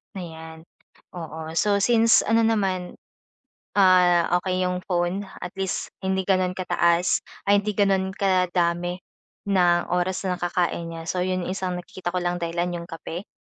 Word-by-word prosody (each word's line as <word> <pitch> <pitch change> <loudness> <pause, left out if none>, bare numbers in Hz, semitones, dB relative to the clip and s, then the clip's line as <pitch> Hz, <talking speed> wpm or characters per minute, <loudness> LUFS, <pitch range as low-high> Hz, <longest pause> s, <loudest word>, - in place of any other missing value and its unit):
Ayan. 160 -2 -9 0.5
Oo, 160 -2 -6
so 200 +3 +2
since 230 +2 +5
ano 225 +1 +3
naman, 195 -5 0 0.8
ah, 180 -2 +5 0.2
okey 185 0 -1
'yong 180 0 -2
phone 175 +2 0 0.2
at - - -7
least 190 -2 -3
hindi 190 0 -1
gano'n 185 -2 +1
ka-taas 175 -1 +2 0.2
ay 200 0 +4
hindi 210 - -1
gano'n 195 -1 +2
ka 185 -3 +1
dami 175 0 0 0.5
ng 180 -3 +3
oras 180 +2 -1
nakakain 175 -2 -1
niya 165 0 -7
so 180 +2 -1
'yong 185 -1 -1
isang 185 -1 -3
nakikita 180 0 -6
ko 180 - -1
lang 175 0 -2
dahilan 170 +1 -2
'yong 170 - -12
kape, 165 +3 -7
180 Hz, 150 wpm, -24 LUFS, 175-190 Hz, 0.8 s, since